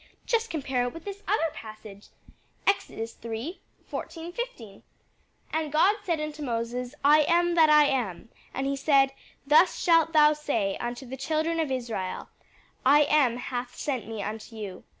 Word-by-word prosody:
just 460 -1 0
compare 265 -5 -1
it 245 - -5
with 330 - -10
this 405 0 -7
other 350 -5 +1
passage 215 -2 -11 0.6
Exodus 230 - -1
iii. 235 +10 -5 0.3
14, 330 +1 -6
15. 305 - -7 0.7
'And 315 -2 -1
God 370 +8 +4
said 340 -6 -1
unto 305 0 -5
Moses, 245 0 -3
I 300 +2 +7
AM 345 +1 +3
THAT 320 -2 +5
I 300 -1 +7
AM: 235 -7 -2 0.2
and 270 - -3
he 275 0 0
said, 275 -1 +3 0.3
Thus 305 +6 +5
shalt 330 -2 +4
thou 300 -1 +6
say 230 -10 -1
unto 240 +2 -5
the 260 +2 -7
children 315 +4 -1
of 315 -3 0
Israel, 235 -8 -4 0.5
I 290 +3 +6
AM 280 -5 +3
hath 245 0 -5
sent 260 -8 -3
me 220 -2 -5
unto 220 +2 -6
you. 200 -4 -7
275 Hz, 160 wpm, -27 LUFS, 235-320 Hz, 0.7 s, I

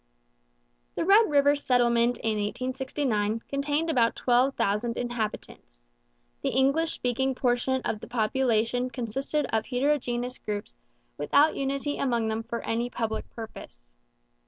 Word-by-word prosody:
The - - -1
Red 410 +3 +6
River 285 0 +4
Settlement 240 -3 +2
in 225 - -1
1869 250 -1 -1
contained 290 +3 -1
about 245 -8 +2
twelve 255 +2 +2
thousand 210 +4 0
inhabitants. 215 - -5 0.6
The - - 0
English 275 +6 +2
speaking 260 +2 -1
portion 255 +1 0
of 215 - -1
the - - -10
population 245 +1 +1
consisted 265 +5 -2
of 220 0 0
heterogeneous 250 -2 -1
groups 205 -1 -5 0.5
without 285 - +4
unity 275 +1 -2
among 235 -4 0
them 220 +1 -1
for 230 +1 -5
any 235 +2 -1
public 225 -2 -3
purpose. - - -10
245 Hz, 125 wpm, -27 LUFS, 225-275 Hz, 0.6 s, Red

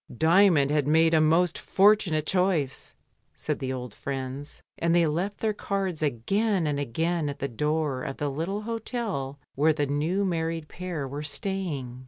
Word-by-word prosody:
"Dymond 160 - +4
had 150 -2 +1
made 160 +2 +4
a 160 - +5
most 165 +2 +3
fortunate 195 -6 +3
choice," 180 -8 0 0.4
said - - -3
the 130 -1 -3
old 125 -4 -5
friends, 135 +2 -6 0.2
and 170 0 +2
they 170 -1 +5
left 175 +7 -2
their 220 -1 +1
cards 195 -5 -2
again 180 - +1
and 145 -1 0
again 160 +4 -1
at 140 - -5
the 140 - -2
door 150 +1 -1
of 135 - -5
the 145 - -1
little 170 +9 -3
hotel 220 - -3 0.2
where 155 +3 +3
the 145 -1 0
new 155 +8 0
married 165 -3 -2
pair 175 -6 -5
were 140 +3 -5
staying. 150 -6 -3
160 Hz, 165 wpm, -27 LUFS, 140-185 Hz, 0.4 s, a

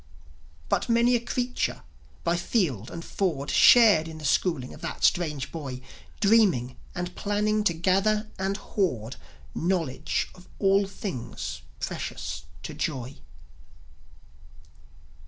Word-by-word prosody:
But - - 0
many 235 +1 +4
a - - +3
creature 245 +1 -2 0.4
by 170 0 +2
field 160 - 0
and 170 0 -7
ford 155 -8 -1
Shared 210 -10 +7
in 160 -1 -8
the 155 - -7
schooling 140 -3 +1
of - - -13
that - - -5
strange 150 -6 +1
boy, 140 -6 -5 0.4
Dreaming 195 - +3 0.2
and 180 0 -3
planning 210 +1 0
to 170 - +3
gather 195 +5 +2
and 195 +1 -1
hoard 135 - -2 0.4
Knowledge 165 -6 -1
of 180 - -16
all 195 0 +3
things 115 - -5 0.2
precious 65 +3 -4 0.2
to - - -6
Joi. 130 -2 -3
175 Hz, 120 wpm, -27 LUFS, 135-205 Hz, 0.4 s, Shared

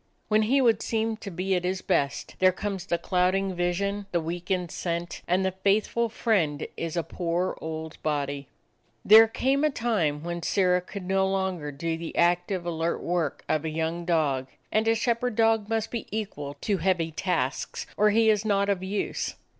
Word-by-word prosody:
When 215 0 +4
he 260 +6 +3
would 230 -4 +3
seem 225 0 -1
to 215 -2 -7
be 185 +2 -2
at 180 -1 +1
his 185 +1 -2
best, 140 -1 0
there 185 0 +6
comes 195 0 -4
the 170 - +1
clouding 185 +2 +1
vision, 195 +3 -1
the 175 - +1
weakened 175 +1 -2
scent, 170 0 -3
and 185 +2 +2
the 190 - +1
faithful 205 +5 +1
friend 180 -10 0
is 165 0 -4
a 170 - +1
poor 175 +2 -2
old 160 0 -6
body. 145 -2 -2 0.6
There 220 +2 +9
came 270 +5 +1
a 305 - +4
time 195 - 0
when 170 0 -4
Sirrah 180 0 +2
could 195 +2 -8
no 190 +1 +2
longer 190 -6 -1
do 165 +3 -3
the 165 - -6
active, 175 +1 +2
alert 165 0 -1
work 170 -4 -1
of 155 -1 +1
a 160 - -2
young 160 +2 -2
dog, 150 -7 +1 0.2
and 220 +1 +2
a 225 - +4
shepherd 235 +1 0
dog 225 -1 +2
must 225 -1 -1
be 235 - -4
equal 150 -10 -4
to 205 -2 0
heavy 175 -4 +1
tasks, 155 -6 -2
or 210 +1 +4
he 220 +1 +4
is 210 -1 +1
not 200 -2 +1
of 195 -2 +1
use. 195 +2 -2
185 Hz, 185 wpm, -27 LUFS, 165-210 Hz, 0.6 s, There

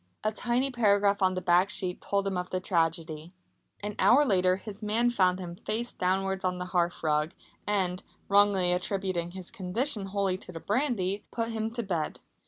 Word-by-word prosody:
A 215 - +1
tiny 245 +4 0
paragraph 205 -4 +3
on 185 -1 +3
the 185 - -3
back 180 +2 +4
sheet 185 -3 0
told 200 0 0
him 195 -1 -1
of 180 0 -3
the 185 - -1
tragedy. 165 -2 -1 0.5
An 205 0 -3
hour 285 +4 +6
later 185 -5 +3
his 205 +1 -9
man 225 +3 +1
found 185 -5 +2
him 175 -2 -7
face 235 +5 -3
downwards 190 +1 -1
on 180 -1 0
the 180 - -4
hearthrug 160 -3 +1 0.3
and, 185 -3 0 0.3
wrongly 200 -3 +4
attributing 185 -1 -2
his 185 -2 -8
condition 215 +2 0
wholly 195 -1 -1
to - - -11
the 165 - -7
brandy, 205 - -1
put 230 -1 -2
him 220 -1 -2
to 235 -1 -3
bed. 170 -6 -2
190 Hz, 180 wpm, -28 LUFS, 180-210 Hz, 0.5 s, hour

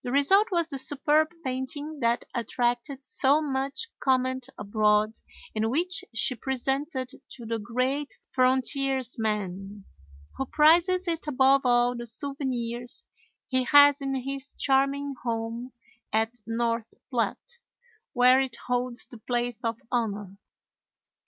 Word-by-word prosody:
The 245 - -4
result 380 - +4
was 340 -2 +1
the 275 -3 -3
superb 295 +3 +2
painting 280 +3 -4
that 235 -1 +1
attracted 245 +3 -2
so 280 +3 +3
much 275 +7 -2
comment 260 -1 0
abroad, 210 +1 +1 0.4
and 220 +1 +1
which 345 +8 0
she 230 +2 +1
presented 265 +2 -2 0.2
to 240 - -9
the 225 0 -2
great 255 +7 -2 0.2
frontiersman, 230 -7 0 0.5
who 270 - -2
prizes 345 +5 +4
it 330 -2 -2
above 270 -1 +4
all 245 0 +3
the 240 0 -6
souvenirs 245 -1 -4 0.4
he 260 -1 +1
has 285 +2 +7
in 270 -1 -2
his 270 +2 -5
charming 275 +1 +1
home 230 +1 -3 0.4
at 220 +1 +1
North 230 0 -1 0.2
Platte, 475 - -2 0.5
where 250 +1 +6
it 260 -3 -3
holds 245 0 -1
the 240 - -13
place 240 0 -2
of 230 -1 -1
honor. 205 -5 -2
255 Hz, 120 wpm, -27 LUFS, 235-280 Hz, 0.5 s, has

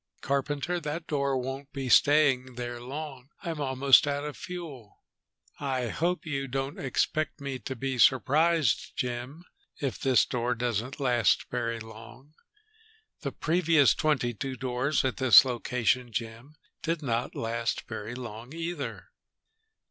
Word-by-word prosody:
"Carpenter, 145 +5 -1
that 155 +1 -4
door 140 -2 0
won't 135 +3 -5
be 135 -2 -4
staying 135 -2 +4
there 120 0 -5
long. 135 0 -7
I'm 165 -4 -4
almost 135 +1 +5
out 145 0 -1
of 150 -1 -5
fuel." 155 - -9 0.6
"I 130 -4 -1
hope 175 +4 -1
you 140 -3 -2
don't 135 +2 -3
expect 155 +3 -1
me 140 -2 -4
to 130 - -5
be 130 +1 -3
surprised, 145 +4 +3
Jim, 125 +6 -4 0.4
if 135 -7 -3
this 130 -2 +4
door 125 0 -1
doesn't 120 +3 -2
last 125 -4 +2
very 115 -2 -2
long. 115 +6 -12 0.9
The - - -4
previous 165 -3 +3
twenty 145 -6 +1
two 130 +5 -4
doors 130 +3 0
at 125 -6 -1
this 130 +1 +8
location, 125 0 0
Jim, 115 +6 -6 0.3
did 165 -1 -2
not 120 -3 -1
last 115 +1 -2
very 110 +1 -6
long 120 +2 -8
either." 165 -8 -5
135 Hz, 135 wpm, -28 LUFS, 120-145 Hz, 0.9 s, this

